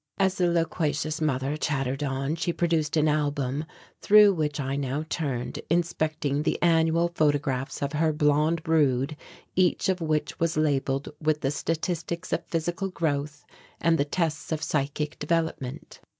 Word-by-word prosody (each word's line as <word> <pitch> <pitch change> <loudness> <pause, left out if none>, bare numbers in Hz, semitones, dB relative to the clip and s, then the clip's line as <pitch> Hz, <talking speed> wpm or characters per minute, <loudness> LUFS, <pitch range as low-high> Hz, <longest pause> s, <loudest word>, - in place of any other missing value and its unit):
As 190 -1 +2
the 180 -2 +1
loquacious 160 -2 0
mother 140 -1 0
chattered 135 -3 -1
on, 135 +1 -1
she 170 +1 -1
produced 165 -3 0
an 155 0 +3
album, 145 -1 0 0.4
through 210 -1 +7
which 150 -3 -2
I 135 0 -2
now 140 +2 -2
turned, 135 -8 -3
inspecting 155 -4 0
the 155 - 0
annual 165 0 +3
photographs 145 -4 0
of 140 +1 -2
her 155 +1 +2
blond 150 +2 +2
brood, 150 -3 +2 0.4
each 185 +1 +2
of 185 -2 0
which 155 -2 -1
was 165 -1 0
labelled 140 -2 0
with 155 -1 +1
the 135 - 0
statistics 165 +3 -3
of - - 0
physical 175 +4 -2
growth 150 -4 -2 0.3
and 165 -1 +2
the - - +4
tests 160 0 -2
of 160 0 -1
psychic 150 0 -2
development. 160 -2 -2
155 Hz, 150 wpm, -26 LUFS, 145-165 Hz, 0.4 s, through